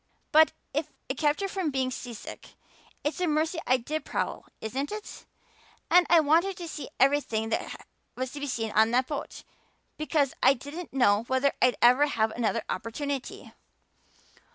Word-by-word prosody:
But 315 +1 +6 0.2
if 300 +2 -1 0.2
it 265 - -3
kept 295 +3 +2
her 395 - 0
from 380 -4 -2
being 260 -2 -1
seasick 240 -3 -8 0.5
it's 305 +5 -2
a 360 - +2
mercy 315 +2 0
I 255 - +4
did 300 +5 -4
prowl, - - -3
isn't 265 - -3
it? 425 0 -8 0.6
And 355 0 +6
I 340 - +7
wanted 335 +6 +2
to 345 - -6
see 305 -2 -6
everything 260 -5 +2
that - - -3 0.3
was 255 0 -3
to 290 - -7
be 285 - -3
seen 225 -4 -2
on 220 +1 +4
that 250 +2 +2
boat, 290 +1 -6 0.5
because 300 -3 +1
I 265 +2 +6
didn't 295 +8 -8
know 225 -5 +3
whether 260 +2 +2
I'd 250 -1 +4
ever 250 +5 +6
have 220 -5 0
another 220 -3 -1
opportunity. 265 +6 -4
280 Hz, 165 wpm, -28 LUFS, 245-310 Hz, 0.6 s, I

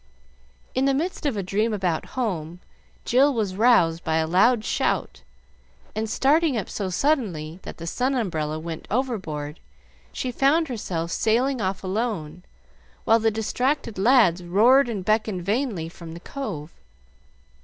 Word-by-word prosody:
In 260 +1 +1
the 275 -1 +3
midst 320 +1 -2
of 255 -7 -1
a 200 - -1
dream 210 +4 0
about 180 -5 -1
home, 175 -8 -2 0.5
Jill 270 +4 +4
was 205 -5 -1
roused 190 -7 +4
by 160 - 0
a 160 0 +2
loud 215 +7 +3
shout, - - -1 0.7
and, 220 +1 -2
starting 290 +2 +2
up 205 - -3
so 195 -3 -3
suddenly 185 - -1
that - - -9
the 165 - -7
sun 255 +10 0
umbrella 155 -10 -2
went 160 0 -7
overboard, 185 - -3 0.5
she 255 - -3
found 285 +5 +2
herself 170 -8 -3
sailing 245 +5 +1
off 190 0 -2
alone, 185 -5 -3 0.6
while 225 +1 +5
the 225 0 +2
distracted 225 +2 -1
lads 200 -6 +4
roared 240 +10 +4
and 200 -5 -4
beckoned 215 -3 0
vainly 205 - -1
from 165 -1 -10
the - - -8
cove. 175 - -6
215 Hz, 145 wpm, -24 LUFS, 170-250 Hz, 0.7 s, while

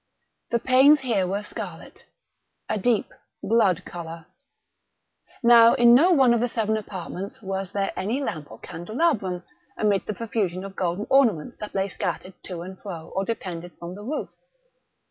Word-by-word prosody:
The 235 - +2
panes 265 +4 +5
here 220 -8 +1
were 200 +3 -2
scarlet—a 210 - -9
deep 225 +1 +1 0.3
blood 195 -5 +2
color. 165 -1 -8 1.2
Now 235 0 +8
in 240 0 +6
no 320 +9 +6
one 265 -7 +5
of 235 - +2
the 245 - +1
seven 220 -2 0
apartments 195 -2 -6
was 195 -1 -3
there 200 -1 -1
any 215 +8 -1
lamp 155 - -4
or - - -11
candelabrum, 190 - -1 0.3
amid 205 -2 +1
the 215 - -3
profusion 195 -5 -2
of 195 -1 -9
golden 180 +3 -1
ornaments 230 - +3
that 210 - -7
lay 195 0 +1
scattered 185 0 -4
to 175 -3 -6
and 185 +1 -9
fro 170 -5 -8
or 195 - +1
depended 175 -6 -5
from 170 +1 -7
the 200 - -9
roof. 285 +8 -3
200 Hz, 155 wpm, -25 LUFS, 180-235 Hz, 1.2 s, Now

